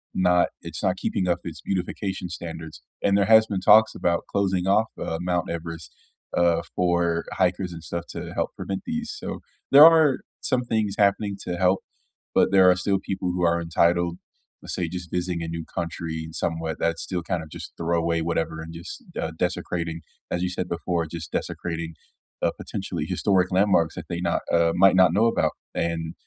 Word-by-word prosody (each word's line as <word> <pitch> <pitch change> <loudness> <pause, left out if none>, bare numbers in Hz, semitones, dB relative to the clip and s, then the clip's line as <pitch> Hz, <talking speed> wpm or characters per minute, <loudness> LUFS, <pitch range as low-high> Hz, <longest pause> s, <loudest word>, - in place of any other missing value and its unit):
not 90 -1 +4
it's - - -6
not - - +1
keeping 95 - -1
up 85 -1 +1
its 85 -2 -7
beautification 95 0 -3
standards, 80 -6 -7 0.2
and 100 0 +3
there 100 - +3
has 110 0 +7
been 100 -3 -2
talks 110 +2 +6
about 85 -1 0
closing 95 -2 0
off, 110 +3 +3
uh, 80 - -2
Mount 90 -1 -1
Everest, 85 -1 -6 0.4
uh, 85 -1 +3
for 85 -2 +1
hikers 90 0 0
and 85 -1 -9
stuff 85 +1 -4
to - - -6
help - - -1
prevent 95 -1 -4
these. 235 -1 -3
So, - - -5 0.3
there 145 +3 +11
are 160 -4 +6 0.2
some 130 -2 +1
things 110 -4 -1
happening 100 0 +2
to 90 - -2
help, 95 +1 +3 0.6
but - - +4
there 95 -2 +7
are 90 - +5
still 95 +1 0
people 95 -2 -2
who 90 0 -2
are 85 0 +2
entitled, 85 +1 +1 0.4
let's - - -5
say, 90 -2 -1
just 90 -1 -6
visiting 90 -1 -1
a - - -4
new 85 0 -4
country 80 -1 -4
in 80 - -10
somewhat 80 -1 -2
that 85 0 0
still 90 -3 -3
kind 85 0 -2
of 80 - -12
just - - -8
throw 85 +1 0
away 85 0 0
whatever 80 -1 -1
and 80 +1 -8
just, 85 +2 -8 0.2
uh, 80 - -2
desecrating, 85 -2 -2 0.3
as 85 - -1
you 90 - 0
said 90 0 -3
before, 85 0 -1
just 80 0 -7
desecrating, 85 -1 -3 0.5
uh, - - +2
potentially - - -4
historic 95 -2 +1
landmarks 90 -4 +3
that 90 - -6
they 85 - -3
not - - 0
uh, 85 0 +4
might 95 +1 +6
not 95 -2 +6
know 105 +4 +4
about, 115 - +2 0.2
and 85 -1 -2
90 Hz, 190 wpm, -25 LUFS, 85-95 Hz, 0.6 s, there